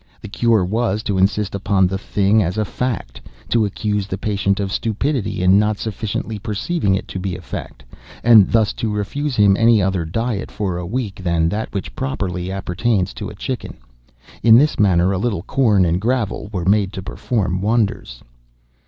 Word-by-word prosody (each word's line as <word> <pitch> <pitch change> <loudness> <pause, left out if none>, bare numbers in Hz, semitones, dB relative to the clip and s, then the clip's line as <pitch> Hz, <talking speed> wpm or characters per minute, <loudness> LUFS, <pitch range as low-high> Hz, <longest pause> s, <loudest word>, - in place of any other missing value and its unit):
The - - -9
cure 110 -3 +2
was, 110 +1 -1
to 100 -2 -1
insist 100 +1 +1
upon 100 -1 +2
the 95 +1 -1
thing 100 +2 +2
as 90 +1 -2
a 110 - +1
fact—to 115 - -3
accuse 105 0 -2
the 95 - -4
patient 100 -1 0
of 100 -1 -2
stupidity 115 -1 -1
in 95 +2 +5
not 105 0 +1
sufficiently 110 0 -4
perceiving 105 - -1
it - - -4
to 95 - -5
be 95 -1 -3
a 90 - -8
fact—and 75 - +1
thus 110 -2 +2
to 110 -3 0
refuse 130 +8 -2
him 100 -3 +5
any 115 +1 +4
other 95 -2 0
diet 110 +5 -3
for 95 -4 -3
a 90 - -5
week 105 -3 -4
than 85 -2 +1
that 105 +4 -3
which 100 -2 -5
properly 90 +6 -3
appertains 95 +1 -1
to - - -6
a - - -10
chicken. - - -5 0.6
In 115 -1 +7
this 150 +4 +2
manner 95 -2 +3
a 95 - -1
little 100 -6 -1
corn 105 -7 +2
and 85 +2 0
gravel 110 -3 -1
were 90 -5 -3
made 100 0 +2
to 95 - -6
perform 95 -3 -2
wonders." 105 - -1
100 Hz, 180 wpm, -19 LUFS, 95-110 Hz, 0.6 s, In